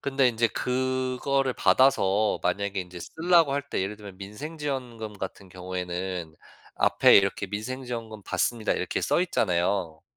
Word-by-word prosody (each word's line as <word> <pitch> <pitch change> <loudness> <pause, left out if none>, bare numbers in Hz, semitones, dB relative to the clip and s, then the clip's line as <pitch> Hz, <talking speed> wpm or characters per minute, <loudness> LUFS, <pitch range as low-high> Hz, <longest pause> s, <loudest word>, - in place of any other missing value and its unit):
근데 135 -2 +2
인제 115 0 +1
그거를 130 +2 0
받아서 110 -6 +3
만약에 100 -1 -1
인제 90 -1 -9
쓰려고 165 - +3
할 140 0 0
때 - - -1
예를 100 +3 -4
들면 100 -3 -11
민생 105 +12 -8
지원금 125 -7 -4
같은 95 0 -7
경우에는 90 -2 -5 0.4
앞에 - - +6
이렇게 100 +1 +2
"민생 110 +7 -5
지원금 115 -3 -6
받습니다." 115 +3 0
이렇게 - - -2
써 - - +2
있잖아요. 90 - 0
110 Hz, 335 characters per minute, -27 LUFS, 95-130 Hz, 0.4 s, 앞에